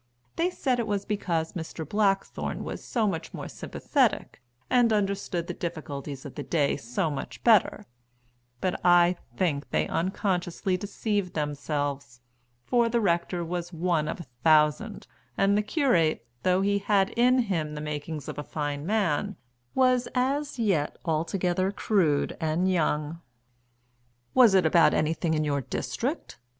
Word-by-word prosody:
They 340 +2 +1
said 260 -8 -1
it 230 - -1
was 205 -2 -1
because 170 -6 -1
Mr. 160 -2 -6
Blackthorne 200 +1 0
was - - -6
so 225 -4 0
much 165 -4 -4
more - - -6
sympathetic, - - -1 0.3
and 245 -2 +4
understood 195 -4 -1
the - - -4
difficulties 145 -5 -6
of 140 - -7
the - - -6
day 150 -4 +1
so 125 +4 -2
much 140 - -6
better; 220 -5 +4 0.8
but 185 - -2
I 175 0 +5 0.2
think 145 -7 0
they - - 0
unconsciously 185 +1 -1
deceived 205 -1 -2
themselves, 145 -3 -3 0.5
for 235 -2 +2
the 235 0 +1
rector 175 -3 0
was 175 +1 -4
one 165 -2 0
of - - -4
a 170 - -7 0.2
thousand, 155 +8 +3 0.3
and 200 +1 +3
the 210 - +3
curate, 205 - +1 0.2
though 185 0 +2
he 200 +1 +2
had 200 -1 +2
in 250 +2 +4
him 170 -11 -1
the - - -5
makings 150 0 -5
of - - -5
a - - -3
fine 145 0 -4
man, 205 -2 0 0.4
was 255 -1 +3
as 275 +3 0
yet 190 -11 0
altogether 175 +3 0
crude 175 -9 +1
and 165 +4 +1
young. 155 -1 0 1.1
"Was 240 -6 +6
it 185 -3 +4
about 165 +1 +5
anything 160 +1 0
in 155 - +1
your 140 -2 0
district?" 115 - -4
175 Hz, 145 wpm, -27 LUFS, 155-205 Hz, 1.1 s, Was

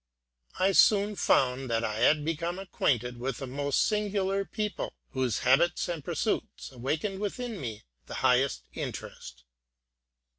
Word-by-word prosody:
I 190 +1 +3
soon 205 +1 +5
found 130 -6 +2
that 115 0 +1
I 110 0 -2
had 150 +3 +4
become 165 +2 -2
acquainted 125 - -1
with 130 0 -3
a 135 - -4
most 140 +2 0
singular 200 -2 0
people, 210 -1 -3 0.2
whose 130 -4 -1
habits 155 +7 +3
and 170 -4 -4
pursuits - - -2
awakened 155 - -2
within 215 +1 -4
me 110 -5 -5 0.2
the - - -6
highest 130 +2 +3
interest. - - -7
150 Hz, 135 wpm, -29 LUFS, 125-195 Hz, 0.2 s, soon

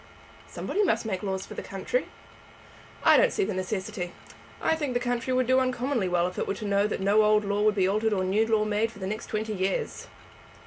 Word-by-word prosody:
"Somebody 415 - -2
must 390 - +1
make 190 -4 -2
laws 190 -2 -3
for - - -10
the - - -5
country." - - -2 1.0
"I - - +7
don't - - +4
see - - 0
the 205 +2 -2
necessity. 185 -1 -3 0.5
I 320 - +2
think 290 -6 -3
the - - +3
country 245 +1 -2
would 255 0 +2
do 260 +2 +4
uncommonly 255 -4 0
well 175 -1 +2
if 180 - -4
it - - -1
were - - -1
to 215 - -6
know 200 0 +2
that 210 - -3
no 200 +3 +4
old 210 0 +3
law 200 +1 0
would 210 0 +3
be 190 -2 +2
altered 215 +3 +1
or 190 -3 +1
new 205 +4 +2
law 220 -1 +2
made 215 +2 0
for 230 - -15
the 190 - -5
next 215 +3 -4
twenty 215 0 -2
years." 190 -1 -2
215 Hz, 230 wpm, -27 LUFS, 195-240 Hz, 1.0 s, I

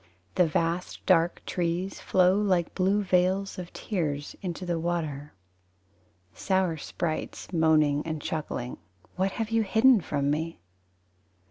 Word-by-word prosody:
The 180 - +3
vast 165 +3 -2
dark 170 -2 +3
trees 175 +2 -2
Flow 185 0 +3
like 185 -5 +1
blue 195 +2 +2
veils 185 +1 +1
Of 175 -1 -7
tears 150 -8 -3
Into 180 -1 -4
the 170 -2 -1
water. 155 - -3 1.0
Sour 190 -4 0
sprites, 160 +4 -4
Moaning 155 -3 +3
and 160 -1 -4
chuckling, 150 -5 -4 0.4
What 190 +1 0
have 225 -1 -3
you 225 0 +3
hidden 220 +2 +5
from 145 -3 -1
me? 160 +2 -2
175 Hz, 125 wpm, -27 LUFS, 160-190 Hz, 1.0 s, hidden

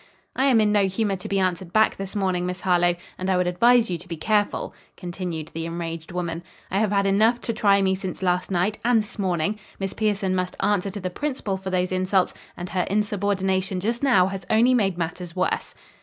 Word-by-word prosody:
"I 265 - +2
am 255 -5 +5
in 210 -1 +3
no 205 -2 +3
humor 195 +1 0
to 180 - -8
be 200 - 0
answered 185 -2 -1
back 220 +2 +3
this 195 +1 -6
morning, 185 -3 0
Miss 180 0 -4
Harlowe, 175 -1 +3 0.2
and 185 +1 -2
I 185 - +3
would 180 - +2
advise 230 +5 +4
you 175 - -2
to 175 - -13
be 170 -2 -5
careful," 205 +5 0 0.2
continued 175 -3 -5
the 165 0 -4
enraged 165 -1 -5
woman. 170 -2 -3 0.3
"I 195 - +1
have 215 -2 +1
had 200 -1 +2
enough 215 +5 +3
to 230 - -2
try 200 -3 +3
me 190 0 +2
since 190 0 -5
last 180 0 +1
night 190 +3 0
and 235 -2 +3
this 220 +1 -11
morning. 185 +2 0 0.2
Miss 195 -1 -3
Pierson 205 -3 0
must 185 -1 -2
answer 200 -1 +1
to 200 +2 -6
the 185 -1 -4
principal 255 -5 -3
for 190 0 -5
those 185 0 0
insults, 185 0 +1 0.2
and 175 0 -6
her 180 -1 -1
insubordination 195 -2 0
just 230 +5 -2
now 240 -10 +4
has 195 0 -4
only 235 +4 +4
made 195 -7 +1
matters 170 +1 -4
worse." 185 0 -1
190 Hz, 215 wpm, -24 LUFS, 180-210 Hz, 0.3 s, am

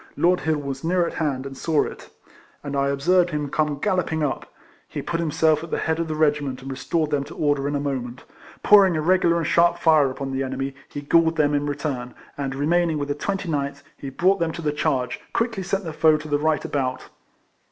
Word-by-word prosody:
Lord 180 +1 +3
Hill 160 -1 0
was 140 -2 -5
near 175 +1 +2
at - - -4
hand, 135 -4 -1
and 135 0 -7
saw 155 +2 +1
it, - - -8 0.5
and 140 -1 -4
I 140 0 +1
observed 175 +6 +2
him 150 -3 -3
come 150 -2 0
galloping 170 -3 0
up. 140 - -3 0.4
He - - -6
put 170 -1 -2
himself 160 -1 +2
at 165 - -8
the - - -1
head 160 0 -1
of 165 - -1
the 155 - -3
regiment, 145 -4 0
and 135 - -6
restored 150 +4 -1
them 145 -2 +1
to - - -11
order 145 -2 0
in 145 - -1
a - - 0
moment. 130 -3 -4 0.4
Pouring 195 -5 +6
a - - 0
regular 175 0 +3
and 165 - -1
sharp 170 +3 +3
fire 155 -5 +4
upon 135 +1 -5
the 135 0 -2
enemy, 135 +1 -3 0.2
he 145 - -6
galled 165 +3 +3
them 150 -2 +2
in 145 0 0
re 145 - -1
turn; 135 -5 -4 0.2
and, 135 -1 -3
remaining 165 +3 +1
with 145 -1 -3
the - - +1
29th 150 -4 -2
till 140 - -21
he 140 - -6
brought 185 +8 +2
them 165 -1 0
to 170 - -6
the 150 - +1
charge, 135 -5 -1
quickly 230 -4 -1
sent 195 +2 -2
the 165 -3 -5
foe 155 0 +4
to 155 0 -8
the 145 -1 0
right 155 -1 0
about. 130 -3 -2
150 Hz, 230 wpm, -23 LUFS, 140-170 Hz, 0.5 s, Pouring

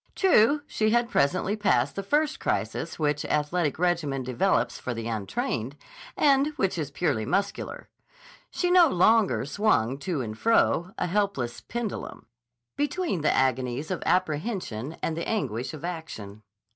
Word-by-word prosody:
True 290 - +4
she 215 -6 0
had 240 +1 +2
presently 185 +8 +1
passed 210 -2 +1
the 195 - -2
first 295 +9 0
crisis - - -2
which 150 -2 0
athletic 150 +1 0
regimen 160 -6 0
develops 125 0 0
for 125 - -4
the 115 0 -4
untrained, 110 +4 -3 0.4
and 280 -1 +4
which 190 -8 0
is 150 -3 -3
purely 145 -7 -1
muscular. 200 - -2 0.6
She 355 -1 -1
no 360 -2 +7
longer 190 - +3
swung 140 - +1
to 170 -4 -2
and 110 -3 -5
fro, 185 - +2
a - - 0
helpless 180 - -1
pendulum, 235 -3 -5 0.5
between 295 - -1
the 155 - +3
agonies 130 +3 0
of 185 - -2
apprehension 160 - -1
and 160 - -1
the 170 - -4
anguish 130 - -2
of 155 0 -7
action. 110 - -7
170 Hz, 145 wpm, -26 LUFS, 130-215 Hz, 0.6 s, no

